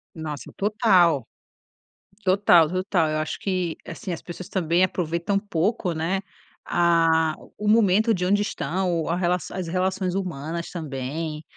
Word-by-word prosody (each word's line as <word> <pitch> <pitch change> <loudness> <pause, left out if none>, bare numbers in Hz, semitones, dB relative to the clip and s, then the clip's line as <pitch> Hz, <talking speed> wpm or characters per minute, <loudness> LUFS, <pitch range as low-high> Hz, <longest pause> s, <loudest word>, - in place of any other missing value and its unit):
Nossa 155 -3 -6
total, 190 - +3 1.0
total, 185 -4 +5
total, 185 -2 0
eu 155 - -1
acho 155 0 -3
que, 185 -4 -1
assim, 180 +2 -5
as 165 - -6
pessoas 175 +1 -8
também 175 -1 +1
aproveitam 175 +2 -1
pouco, 200 0 -1
né, 170 +5 -1 0.4
a 165 -2 +3 0.2
o 210 - -4
momento 215 +1 +4
de 180 -3 -1
onde 205 +2 +3
estão, 180 -4 -1
a 170 - 0
relação 180 0 -1
as 185 -2 -3
relações 185 +1 -1
humanas 170 -3 -4
também. 150 0 -5
175 Hz, 135 wpm, -24 LUFS, 160-190 Hz, 1.0 s, total